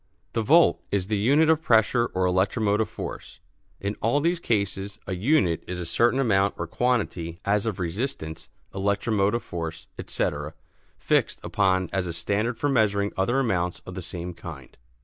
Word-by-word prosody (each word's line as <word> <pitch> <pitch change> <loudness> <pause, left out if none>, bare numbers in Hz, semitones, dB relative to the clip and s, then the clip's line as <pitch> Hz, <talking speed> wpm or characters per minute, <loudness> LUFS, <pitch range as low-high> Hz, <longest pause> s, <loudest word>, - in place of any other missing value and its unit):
The 115 - +1
volt 160 +9 +5
is 100 -1 -1
the 105 - +1
unit 140 +9 +4
of 160 -1 +3
pressure 120 -2 +3
or 95 0 +2
electromotive 100 +3 +1
force. - - -7 0.4
(In 100 +1 -2
all 115 +6 +2
these 170 +3 +1
cases 100 - -1
a 95 - -3
"unit" 95 - +2
is 90 0 -4
a 90 - -4
certain 120 +9 +2
amount 100 -6 +2
or 85 - -3
quantity 90 -6 -1
as 105 +2 +1
of 105 -4 -2
resistance, 85 - -4 0.2
electromotive 100 +2 +1
force, 80 -5 -5
etc. 75 +2 -3 0.4
fixed - - +1
upon 95 -2 +1
as 95 -2 0
a 85 - -3
standard 105 +8 -1
for 145 - 0
measuring 105 -6 +2
other 95 +7 +1
amounts 90 -9 0
of 90 - -8
the 95 - -5
same 90 0 -6
kind.) 80 -6 -10
100 Hz, 165 wpm, -25 LUFS, 90-115 Hz, 0.4 s, volt